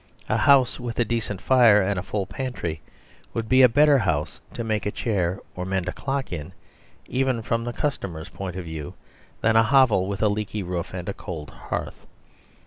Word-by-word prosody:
A - - +1
house 135 -3 +4
with 120 -2 -5
a 120 - +2
decent 110 -3 -2
fire 120 -5 +6
and 100 -1 0
a - - -2
full 100 +1 -3
pantry 110 - -4 0.5
would 115 -1 -2
be 130 +3 +5
a 125 - +8
better 145 +3 +5
house 80 -8 -1 0.2
to 120 - -3
make 110 -2 -1
a - - 0
chair 95 -5 -1 0.2
or 90 - -4
mend 95 -1 -2
a - - 0
clock 135 -2 -3
in, 80 +2 -6 0.5
even 130 -3 0
from 115 +1 -1
the 120 - -2
customer's 95 - -3
point 95 -2 -6
of 95 -2 -5
view, 80 -3 -6 0.5
than 115 0 +3
a 115 - +7
hovel 115 -5 +4
with 100 +1 -2
a - - +5
leaky 105 0 -2
roof 90 -1 -4
and 90 -1 -5
a 100 - -2
cold 80 -7 -7
hearth. - - -6
105 Hz, 200 wpm, -24 LUFS, 90-120 Hz, 0.5 s, a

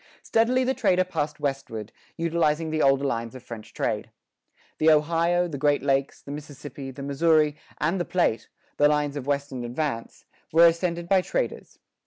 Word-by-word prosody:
Steadily 245 +3 +2
the 260 +1 +1
trader 185 -7 +2
passed 155 -4 -3
westward, 135 -6 -4 0.3
utilizing 165 -1 0
the 155 0 0
older 135 0 +4
lines 115 -2 -2
of 130 - -10
French 115 -3 -9
trade. - - -2 0.7
The 155 - +5
Ohio, 165 +3 +3
the 145 -5 -6
Great 145 -1 +2
Lakes, 135 -1 0
the 140 - -8
Mississippi, 145 -2 -8
the 135 +1 -8
Missouri, 150 +1 +3 0.2
and 170 +5 0
the - - -2
Platte, 115 - 0 0.3
the 145 - +5
lines 150 -1 0
of 140 -2 -5
western 140 -3 -2
advance, 120 -1 -4 0.3
were 165 +2 +7
ascended 170 0 +1
by 190 0 +4
traders. - - -3
150 Hz, 165 wpm, -25 LUFS, 135-170 Hz, 0.7 s, were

